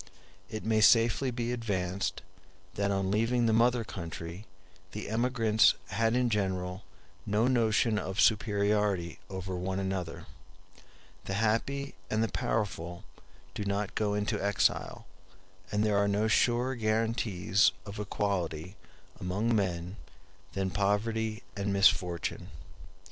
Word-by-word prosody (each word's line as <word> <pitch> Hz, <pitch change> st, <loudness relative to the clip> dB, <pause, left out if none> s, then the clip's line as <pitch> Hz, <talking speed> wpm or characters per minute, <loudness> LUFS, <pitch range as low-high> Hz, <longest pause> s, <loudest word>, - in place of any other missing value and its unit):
It 110 Hz, -1 st, -6 dB
may 110 Hz, -1 st, +2 dB
safely 115 Hz, +4 st, +5 dB
be 120 Hz, -1 st, -2 dB
advanced, 100 Hz, -6 st, -2 dB, 0.5 s
that 100 Hz, 0 st, 0 dB
on 95 Hz, -1 st, 0 dB
leaving 115 Hz, +3 st, +2 dB
the 115 Hz, -, +3 dB
mother 120 Hz, +1 st, +3 dB
country 85 Hz, 0 st, -7 dB, 0.5 s
the 105 Hz, -, -5 dB
emigrants 115 Hz, -1 st, +3 dB
had 115 Hz, +3 st, +1 dB
in 125 Hz, -1 st, +2 dB
general 95 Hz, -2 st, -1 dB, 0.4 s
no 105 Hz, +3 st, +1 dB
notion 115 Hz, -3 st, +2 dB
of 95 Hz, +2 st, -4 dB
superiority 105 Hz, -5 st, +2 dB
over 95 Hz, -1 st, -4 dB
one 95 Hz, +1 st, -2 dB
another. 95 Hz, -3 st, -3 dB, 1.0 s
The 95 Hz, -, -3 dB
happy 115 Hz, +7 st, 0 dB, 0.2 s
and 110 Hz, +1 st, +1 dB
the 115 Hz, -, 0 dB
powerful 90 Hz, -5 st, -2 dB, 0.5 s
do -, -, -4 dB
not 100 Hz, 0 st, -2 dB
go 105 Hz, -1 st, 0 dB
into 105 Hz, 0 st, -1 dB
exile, 100 Hz, 0 st, 0 dB, 0.7 s
and 105 Hz, +1 st, +1 dB
there 105 Hz, -2 st, +2 dB
are 100 Hz, -, +2 dB
no 105 Hz, +2 st, +1 dB
surer 120 Hz, +3 st, +2 dB
guarantees 110 Hz, -4 st, +1 dB
of 100 Hz, 0 st, -7 dB
equality 95 Hz, -4 st, -2 dB, 0.4 s
among 100 Hz, +6 st, 0 dB
men 90 Hz, -1 st, -1 dB, 0.6 s
than 95 Hz, -1 st, -1 dB
poverty 110 Hz, +3 st, 0 dB
and 100 Hz, 0 st, -2 dB
misfortune. 90 Hz, -3 st, +2 dB
105 Hz, 120 wpm, -30 LUFS, 95-115 Hz, 1.0 s, safely